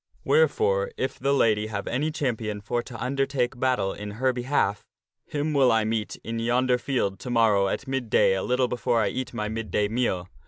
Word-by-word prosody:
Wherefore, 480 +1 +2
if 455 - -3
the 135 +2 +1
lady 110 -6 +2
have 105 -2 -4
any 140 +6 -1
champion 115 -9 -2
for 120 +4 -2
to 120 -1 -10
under 135 +3 0
take 125 -2 -1
battle 125 -7 +1
in 105 0 -7
her 130 +1 +2
behalf, 120 -5 0 0.4
him 150 +1 -2
will 135 -3 +4
I 110 -1 +3
meet 110 -1 -2
in 115 0 -4
yonder 125 +2 +2
field 110 -8 -1
to 125 - -7
morrow 110 -5 +3
at 135 +8 -3
mid 130 -3 -2
day 95 - +4
a 95 - -1
little 125 +3 +1
before 120 -1 0
I 105 -3 +2
eat 130 +5 -4
my 105 -3 -3
mid 110 -1 -4
day 105 +4 +1
meal. 105 -6 -1
120 Hz, 205 wpm, -26 LUFS, 105-130 Hz, 0.4 s, will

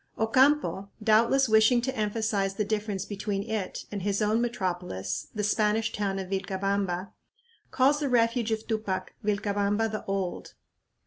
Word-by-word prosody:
Ocampo, 255 -3 +2
doubtless 230 +5 +4
wishing 220 +2 +5
to 260 +2 -2
emphasize 210 -3 -1
the 210 - -1
difference 210 -2 -2
between 200 -1 -3
it 215 -3 -4
and 205 -2 -4
his 200 +1 0
own 215 +2 +2
metropolis, 180 - -3
the 210 - -1
Spanish 215 +1 +1
town 200 -2 -1
of 190 -1 -5
Vilcabamba, 195 -1 -2 0.6
calls 275 +3 +3
the 290 -2 -1
refuge 230 -1 +2
of 220 0 -2
Tupac 215 -4 -2
"Vilcabamba 205 +1 0
the 215 - -4
old." 195 -2 -3
210 Hz, 140 wpm, -28 LUFS, 195-225 Hz, 0.6 s, wishing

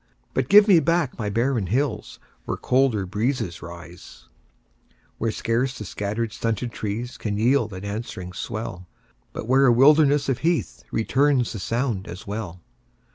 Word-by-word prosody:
But - - -1
give 210 +1 +8
me 185 -5 +7
back 165 -5 0
my 105 -2 -2
barren 115 -1 0
hills 120 +2 -2 0.3
Where - - -3
colder 125 -6 +1
breezes 105 -2 -2
rise; 85 -6 -12 0.9
Where 115 - 0
scarce 125 +4 -1
the 105 - -6
scattered, 105 +5 -3
stunted 115 +1 -2
trees 110 +4 -5
Can 105 -2 -2
yield 115 0 +2
an 95 +1 -7
answering 100 -4 -6
swell, 95 -4 -6 0.4
But - - -6
where 135 +2 +5
a - - +6
wilderness 145 +3 +5
of 130 -3 0
heath 165 +2 -1
Returns 130 +2 +1
the 110 - -5
sound 115 -2 -2
as 90 +2 -8
well. 100 -4 -6
115 Hz, 150 wpm, -24 LUFS, 100-135 Hz, 0.9 s, give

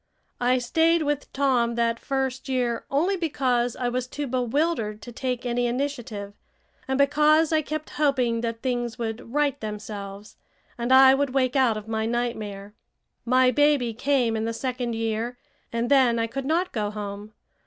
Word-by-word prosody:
I 250 +1 +3
stayed 325 +6 +2
with 290 -1 -2
Tom 250 -4 +1
that 230 0 0
first 265 0 -2
year 245 -3 -1
only 335 +8 +1
because 255 -8 0
I 250 - -2
was 250 +1 -2
too 290 +3 -4
bewildered 250 -3 -1
to 240 - -8
take 250 0 -3
any 245 0 0
initiative, 240 -6 -3 0.5
and 265 0 0
because 300 +3 +4
I 310 - +3
kept 310 +1 -5
hoping 250 -6 +2
that 230 -1 -4
things 240 -3 -2
would 230 0 -5
right 290 0 0
themselves 210 -1 -7 0.4
and 240 +1 -3
I 265 0 +8
would 275 -1 0
wake 255 -1 +2
out 250 -5 +3
of 215 0 -8
my 220 0 -1
nightmare. 215 -4 -3 0.5
My 255 +1 +4
baby 285 -3 +2
came 245 -1 +1
in 220 0 -1
the 230 - -2
second 245 -1 -3
year, 225 +2 -2 0.3
and 235 +1 -1
then 255 -4 +5
I 230 - +1
could 265 +4 -5
not 345 +5 0
go 210 -4 -2
home. 205 0 -7
245 Hz, 165 wpm, -25 LUFS, 230-275 Hz, 0.5 s, I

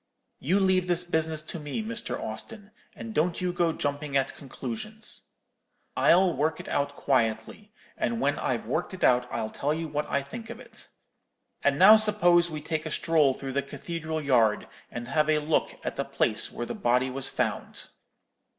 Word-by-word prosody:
You 180 +9 +2
leave 185 -1 +2
this 175 0 +2
business 160 -2 -1
to 165 - -5
me, 150 +9 -4
Mr. 230 +1 -3
Austin, 205 - -6 0.2
and 225 -1 -7
don't 170 +1 +1
you 180 -1 -1
go 170 -1 +2
jumping 145 -2 -2
at 135 0 -1
conclusions. 215 - -6 0.7
I'll 180 0 +4
work 155 +4 0
it - - -8
out 145 0 -1
quietly: 115 - -1 0.2
and 235 - -1
when - - +1
I've - - -1
worked 190 - -2
it - - -7
out 125 0 +3
I'll 110 - -3
tell 145 +2 -1
you 165 0 -3
what 150 0 -3
I 140 - 0
think 225 - -9
of 235 0 -7
it. - - -7 0.7
And - - +2
now 215 +1 +9
suppose 175 -5 +4
we 155 -2 -5
take 155 0 -3
a - - -5
stroll 155 -5 +3
through 135 -1 -6
the 140 - +1
cathedral 160 +2 -5
yard, 120 -7 +2 0.2
and 120 0 -6
have 155 +2 +1
a 155 - +4
look 150 +1 0
at - - -4
the - - 0
place - - +1
where 120 - -4
the - - -5
body 130 - +1
was 135 0 -3
found.' - - -2
155 Hz, 185 wpm, -27 LUFS, 140-185 Hz, 0.7 s, now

